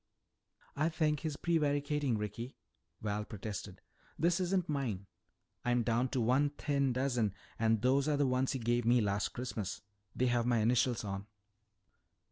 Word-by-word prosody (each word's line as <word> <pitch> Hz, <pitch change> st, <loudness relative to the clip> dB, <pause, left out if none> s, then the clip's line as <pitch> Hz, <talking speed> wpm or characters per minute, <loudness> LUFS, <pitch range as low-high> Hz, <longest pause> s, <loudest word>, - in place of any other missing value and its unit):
"I 155 Hz, +3 st, +2 dB
think 155 Hz, -2 st, +1 dB
he's 155 Hz, -3 st, -3 dB
prevaricating, 145 Hz, -5 st, +1 dB
Ricky," 105 Hz, +5 st, -5 dB, 0.5 s
Val 105 Hz, 0 st, -1 dB
protested. 100 Hz, -3 st, -6 dB, 0.4 s
"This 170 Hz, +2 st, +2 dB
isn't 180 Hz, -1 st, +1 dB
mine. 125 Hz, -10 st, -2 dB, 0.6 s
I'm 120 Hz, -1 st, +2 dB
down 120 Hz, +3 st, +1 dB
to 130 Hz, -, -1 dB
one 130 Hz, +5 st, +3 dB
thin 140 Hz, -3 st, +1 dB
dozen 120 Hz, -6 st, 0 dB, 0.2 s
and 110 Hz, -1 st, +2 dB
those 135 Hz, +3 st, +3 dB
are 150 Hz, -1 st, +2 dB
the 145 Hz, -, +3 dB
ones 130 Hz, +1 st, +1 dB
you 130 Hz, -, -3 dB
gave 120 Hz, +1 st, +1 dB
me 120 Hz, +2 st, +4 dB
last 100 Hz, -2 st, 0 dB
Christmas. 115 Hz, -6 st, -4 dB, 0.3 s
They 125 Hz, -, +2 dB
have 120 Hz, -1 st, +2 dB
my 120 Hz, -1 st, +3 dB
initials 120 Hz, +2 st, +2 dB
on." 100 Hz, 0 st, -4 dB
125 Hz, 150 wpm, -34 LUFS, 110-145 Hz, 0.6 s, me